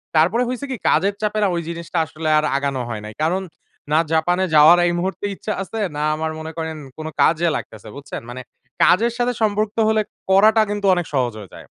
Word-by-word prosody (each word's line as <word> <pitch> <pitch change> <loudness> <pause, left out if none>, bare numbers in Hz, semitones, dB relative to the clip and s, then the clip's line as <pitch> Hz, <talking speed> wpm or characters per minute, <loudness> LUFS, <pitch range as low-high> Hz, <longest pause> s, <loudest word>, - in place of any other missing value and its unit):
তারপরে 180 +10 +3
হইছে 255 +2 -4
কি - - -1
কাজের 195 +6 +2
চাপে 215 0 -1
না - - +4
ওই 170 - -1
জিনিসটা 170 +1 -5
আসলে 160 0 -4
আর 155 - +2
আগানো 140 -2 -2
হয় 110 -3 -5
নাই। 105 - -8
কারণ 180 +4 +1 0.5
না 155 - +4
জাপানে 175 +3 +2
যাওয়ার 155 +3 +8
এই - - +1
মুহূর্তে 190 +3 -3
ইচ্ছা 215 - -4
আছে। 220 +3 -5 0.2
না 150 - -2
আমার 160 0 -3
মনে 160 0 -6
করেন 160 -1 -4 0.2
কোন 155 0 -6
কাজে 170 +2 +3
লাগতেছে। 110 0 -7
বুঝছেন? 140 0 -7
মানে 125 +1 -7 0.4
কাজের 230 +6 +4
সাথে 245 0 0
সম্পর্ক 210 0 +1 0.2
হলে 220 0 +2 0.3
করাটা 215 +3 +5
কিন্তু 205 -1 -3
অনেক 175 -2 -1
সহজ 125 -4 0
হয়ে 100 -3 -11
যায়। - - -12
170 Hz, 205 wpm, -20 LUFS, 155-205 Hz, 0.5 s, যাওয়ার